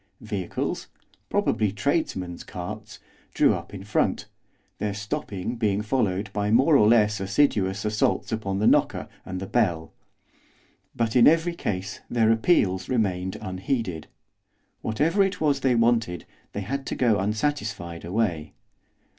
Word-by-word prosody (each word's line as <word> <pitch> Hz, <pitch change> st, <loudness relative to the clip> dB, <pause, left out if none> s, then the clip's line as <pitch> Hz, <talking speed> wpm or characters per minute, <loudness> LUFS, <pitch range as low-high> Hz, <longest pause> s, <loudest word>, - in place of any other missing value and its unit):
Vehicles 100 Hz, -5 st, -3 dB, 0.4 s
probably 105 Hz, -3 st, +1 dB
tradesmen's 100 Hz, -, -2 dB
carts 105 Hz, +3 st, -7 dB, 0.4 s
drew -, -, +5 dB
up -, -, -6 dB
in 95 Hz, -1 st, -8 dB
front, 105 Hz, -, 0 dB, 0.5 s
their 105 Hz, -1 st, -2 dB
stopping 105 Hz, +1 st, -4 dB
being 105 Hz, -2 st, 0 dB
followed 105 Hz, -4 st, -1 dB
by 105 Hz, 0 st, -1 dB
more 135 Hz, +8 st, +5 dB
or 105 Hz, -6 st, +6 dB
less 105 Hz, -2 st, +4 dB
assiduous 100 Hz, -2 st, +1 dB
assaults 105 Hz, +2 st, 0 dB
upon 100 Hz, -3 st, -2 dB
the 105 Hz, -, 0 dB
knocker -, -, +3 dB, 0.2 s
and 95 Hz, 0 st, -4 dB
the 95 Hz, -, -4 dB
bell. 90 Hz, -8 st, 0 dB, 1.0 s
But 115 Hz, 0 st, -1 dB
in 120 Hz, -, +7 dB
every 165 Hz, +2 st, +4 dB
case 100 Hz, -, -4 dB
their 115 Hz, -2 st, +3 dB
appeals 110 Hz, -, +2 dB
remained 95 Hz, -7 st, 0 dB
unheeded. 95 Hz, -, -3 dB, 0.7 s
Whatever 155 Hz, -, +1 dB
it 195 Hz, 0 st, +1 dB
was 145 Hz, -3 st, +2 dB
they 130 Hz, -2 st, +2 dB
wanted, 115 Hz, -6 st, +1 dB, 0.3 s
they 100 Hz, -, -3 dB
had 135 Hz, +7 st, -4 dB
to -, -, -2 dB
go 115 Hz, -5 st, +2 dB
unsatisfied 105 Hz, -, -2 dB
away. 85 Hz, -5 st, -1 dB
105 Hz, 135 wpm, -25 LUFS, 95-120 Hz, 1.0 s, in